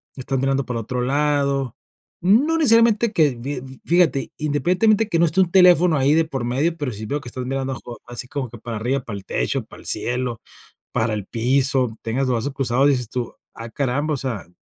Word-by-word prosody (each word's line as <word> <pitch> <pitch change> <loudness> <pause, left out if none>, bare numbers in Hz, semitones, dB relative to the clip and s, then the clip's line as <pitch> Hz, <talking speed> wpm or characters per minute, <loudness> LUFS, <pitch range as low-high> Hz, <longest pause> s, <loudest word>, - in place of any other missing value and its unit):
estás 135 0 -3
mirando 135 +1 +1
para 125 -2 -3
otro 125 +3 -3
lado, 140 -1 0 0.5
no 250 - +3
necesariamente 230 -6 +4
que 150 -8 +3
fi 130 0 -6
fíjate, 165 -6 +2
independientemente 180 +9 +2
que 170 - +1
no 170 - +5
esté 170 +4 +2
un 180 - +2
teléfono 180 -3 +5
ahí 140 +2 +3
de 165 +1 +4
por 135 -6 -4
medio, 145 +8 0
pero 145 -5 -3
sí 110 0 -7
veo 145 +6 -1
que 120 - -9
estás 125 +1 -6
mirando, 135 0 -2 0.3
así 120 0 -7
como 135 0 -4
que, 120 0 -11
para 115 0 -5
arriba, 125 +6 -1
para 105 -4 -6
el 95 - -11
techo, - - -1
para - - -14
el - - -9
cielo, 125 -2 -2 0.5
para 110 0 0
el 105 -2 -5
piso, 125 +1 +1
tengas 130 +4 -1
los 130 - +1
brazos 120 +5 -2
cruzados, 135 0 +2
dices 125 -5 0
tú, 125 -2 -4 0.2
ah 115 0 -8
caramba, 145 +4 -1
o - - -3
sea, 120 -9 -4
135 Hz, 205 wpm, -21 LUFS, 125-155 Hz, 0.5 s, no